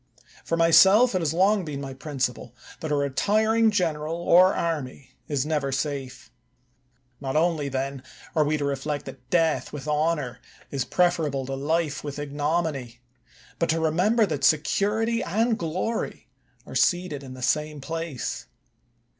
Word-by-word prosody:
For 165 Hz, -, -1 dB
myself, 190 Hz, +8 st, +6 dB
it 185 Hz, -, 0 dB
has 155 Hz, -3 st, 0 dB
long 190 Hz, +4 st, +3 dB
been 150 Hz, -4 st, -5 dB
my 135 Hz, -1 st, -6 dB
principle, 130 Hz, -4 st, -4 dB, 0.2 s
that 155 Hz, -, -4 dB
a -, -, +3 dB
retiring 215 Hz, +11 st, +2 dB
general 165 Hz, -6 st, -1 dB
or 175 Hz, +2 st, +5 dB
army 140 Hz, -7 st, -3 dB, 0.2 s
is 140 Hz, -2 st, -1 dB
never 150 Hz, -3 st, -1 dB
safe. 135 Hz, -2 st, -4 dB, 0.9 s
Not 135 Hz, 0 st, -4 dB
only, 155 Hz, -3 st, +1 dB
then, 135 Hz, 0 st, -3 dB, 0.3 s
are 155 Hz, -, +4 dB
we 150 Hz, +1 st, 0 dB
to 145 Hz, -, -2 dB
reflect 140 Hz, +1 st, -3 dB
that 125 Hz, -2 st, -11 dB
death 165 Hz, -3 st, +1 dB
with 150 Hz, 0 st, -7 dB
honor 150 Hz, -5 st, 0 dB, 0.3 s
is 135 Hz, -2 st, -1 dB
preferable 160 Hz, -7 st, +1 dB
to 135 Hz, -, -5 dB
life 150 Hz, +2 st, -1 dB
with 145 Hz, -1 st, -5 dB
ignominy, 145 Hz, -4 st, -2 dB, 0.6 s
but 170 Hz, -, 0 dB
to 165 Hz, +1 st, +2 dB
remember 180 Hz, +8 st, +3 dB
that 150 Hz, -7 st, -4 dB
security 210 Hz, -, +2 dB
and 225 Hz, +6 st, +1 dB
glory 185 Hz, +8 st, -3 dB, 0.4 s
are -, -, -10 dB
seated 175 Hz, -5 st, +1 dB
in 130 Hz, -2 st, -9 dB
the 130 Hz, -, -8 dB
same 150 Hz, +3 st, 0 dB
place. 165 Hz, -2 st, -4 dB
155 Hz, 145 wpm, -25 LUFS, 140-175 Hz, 0.9 s, myself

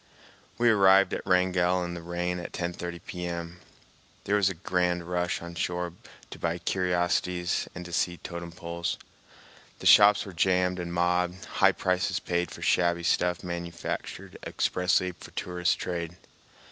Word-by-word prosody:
We 120 Hz, 0 st, +5 dB
arrived 95 Hz, -2 st, +5 dB
at -, -, -3 dB
Wrangell 90 Hz, 0 st, +2 dB
in 85 Hz, -, -5 dB
the 85 Hz, -, -6 dB
rain 90 Hz, +1 st, -2 dB
at 85 Hz, -, -7 dB
10.30 85 Hz, 0 st, -4 dB
P.M. 85 Hz, -1 st, -5 dB, 0.6 s
There 100 Hz, -, +1 dB
was 100 Hz, -2 st, +4 dB
a 95 Hz, -, -5 dB
grand 90 Hz, 0 st, 0 dB
rush 90 Hz, 0 st, -2 dB
on 85 Hz, 0 st, -7 dB
shore 90 Hz, 0 st, -2 dB, 0.4 s
to -, -, -9 dB
buy 85 Hz, 0 st, -1 dB
curiosities 90 Hz, -1 st, 0 dB
and 90 Hz, -1 st, -7 dB
see 85 Hz, +1 st, 0 dB
totem 85 Hz, -1 st, -7 dB
poles. 85 Hz, 0 st, -4 dB, 0.8 s
The -, -, -10 dB
shops 105 Hz, 0 st, +7 dB
were 95 Hz, -, -9 dB
jammed 90 Hz, +1 st, +2 dB
and 85 Hz, -1 st, -4 dB
mobbed, 90 Hz, +1 st, 0 dB
high -, -, +3 dB
prices 90 Hz, 0 st, 0 dB
paid 90 Hz, 0 st, -1 dB
for -, -, -9 dB
shabby 85 Hz, -1 st, +2 dB
stuff 90 Hz, +1 st, +1 dB
manufactured 85 Hz, -1 st, -5 dB
expressly 90 Hz, 0 st, +1 dB
for 85 Hz, -, -13 dB
tourist 90 Hz, -1 st, -1 dB
trade. 85 Hz, -1 st, -4 dB
90 Hz, 145 wpm, -28 LUFS, 85-90 Hz, 0.8 s, shops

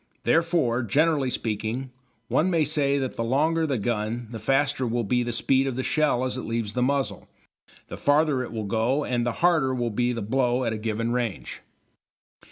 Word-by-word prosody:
Therefore, 160 Hz, -8 st, +2 dB
generally 145 Hz, +4 st, +2 dB
speaking, 115 Hz, +3 st, -3 dB, 0.4 s
one 170 Hz, +11 st, +2 dB
may 165 Hz, -4 st, +2 dB
say 145 Hz, -2 st, +2 dB
that 130 Hz, -2 st, -3 dB
the 115 Hz, -, -1 dB
longer 155 Hz, +7 st, +1 dB
the 135 Hz, -4 st, 0 dB
gun 110 Hz, +1 st, -2 dB
the 115 Hz, -, -6 dB
faster 135 Hz, +3 st, +1 dB
will 120 Hz, +1 st, -1 dB
be 125 Hz, +4 st, +1 dB
the 120 Hz, 0 st, -2 dB
speed 135 Hz, +3 st, +2 dB
of 130 Hz, -, -2 dB
the 130 Hz, -, -2 dB
shell 145 Hz, -5 st, +1 dB
as 130 Hz, 0 st, -3 dB
it -, -, -3 dB
leaves 115 Hz, -2 st, -3 dB
the 125 Hz, -, -1 dB
muzzle, 135 Hz, +1 st, -1 dB, 0.6 s
the -, -, -7 dB
farther 145 Hz, 0 st, +2 dB
will 110 Hz, -1 st, -4 dB
it -, -, -5 dB
go 115 Hz, +7 st, +1 dB
and 120 Hz, -1 st, -1 dB
the -, -, +1 dB
harder 150 Hz, -7 st, +3 dB
will 120 Hz, -2 st, -1 dB
be 120 Hz, +3 st, 0 dB
the 115 Hz, -3 st, -3 dB
blow 125 Hz, +2 st, +1 dB
at 115 Hz, -2 st, -1 dB
a -, -, -3 dB
given 115 Hz, +1 st, -2 dB
range. 120 Hz, -5 st, -3 dB
125 Hz, 195 wpm, -25 LUFS, 115-140 Hz, 0.6 s, harder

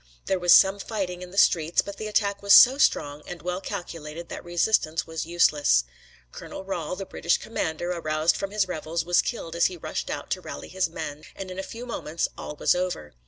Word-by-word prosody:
There 190 Hz, -, 0 dB
was 175 Hz, 0 st, +3 dB
some 195 Hz, +1 st, +7 dB
fighting 190 Hz, -4 st, -4 dB
in 180 Hz, -, -8 dB
the 195 Hz, -, -11 dB
streets, 165 Hz, -3 st, +4 dB
but 200 Hz, 0 st, -8 dB
the 215 Hz, -, -5 dB
attack 200 Hz, -1 st, 0 dB
was 200 Hz, 0 st, +5 dB
so 265 Hz, +3 st, +9 dB
strong 145 Hz, -, +2 dB
and 175 Hz, -3 st, -8 dB
well 180 Hz, +1 st, -3 dB
calculated 165 Hz, -2 st, -7 dB
that -, -, -7 dB
resistance 175 Hz, -2 st, +1 dB
was 160 Hz, 0 st, -5 dB
useless. 150 Hz, -, +3 dB, 0.5 s
Colonel -, -, -8 dB
Rahl, 180 Hz, -3 st, -4 dB
the 195 Hz, -, -6 dB
British 170 Hz, -2 st, 0 dB
commander, 175 Hz, -5 st, -3 dB
aroused 155 Hz, -2 st, +1 dB
from 195 Hz, -, -3 dB
his 205 Hz, -1 st, 0 dB
revels, 165 Hz, -1 st, -3 dB
was 175 Hz, 0 st, +4 dB
killed 170 Hz, -9 st, -5 dB
as 170 Hz, -, +4 dB
he 180 Hz, -, -7 dB
rushed -, -, -4 dB
out -, -, -5 dB
to -, -, -1 dB
rally 70 Hz, -, -8 dB
his 190 Hz, -2 st, -1 dB
men, 155 Hz, -2 st, -7 dB
and 190 Hz, -1 st, -7 dB
in 185 Hz, -, -6 dB
a -, -, 0 dB
few 230 Hz, +5 st, -8 dB
moments 165 Hz, -9 st, -2 dB
all 150 Hz, -, -7 dB
was -, -, +3 dB
over. 180 Hz, -, -3 dB
175 Hz, 210 wpm, -25 LUFS, 160-195 Hz, 0.5 s, so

